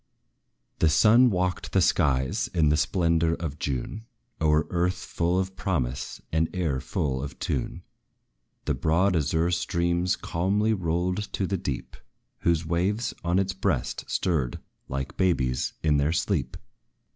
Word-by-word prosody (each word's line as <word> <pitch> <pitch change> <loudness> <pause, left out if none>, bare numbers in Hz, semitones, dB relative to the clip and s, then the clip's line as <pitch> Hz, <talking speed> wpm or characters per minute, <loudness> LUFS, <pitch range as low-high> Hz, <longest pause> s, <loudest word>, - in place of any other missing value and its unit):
The 80 - +4
sun 115 +9 +6
walked 90 -2 -1
the 95 - +4
skies 65 -8 +2
in 80 -3 +4
the 75 - +4
splendor 85 -1 +2
of 75 -4 -5
June, 70 - -4 0.3
O'er 75 -1 +3
earth 90 +1 +1
full 85 +1 -1
of 95 0 -3
promise, 65 -9 -2
and 80 0 +1
air 80 -8 0
full 65 +1 -2
of 70 -2 -6
tune; - - -3 0.8
The - - +1
broad 85 +8 +2
azure 80 +2 +1
streams 85 +1 +1
calmly 100 +6 0
rolled 90 +2 -1
to 95 - 0
the 95 - -1
deep, 70 -8 -4 0.4
Whose 85 -1 +1
waves 95 +8 0
on 85 +1 +1
its 95 -1 +1
breast 90 -9 -1
stirred 75 -9 -1 0.3
like 70 +1 -4
babes 65 -10 +1
in 75 -2 +3
their 70 +3 +2
sleep. 80 - -1
85 Hz, 140 wpm, -26 LUFS, 75-95 Hz, 0.8 s, sun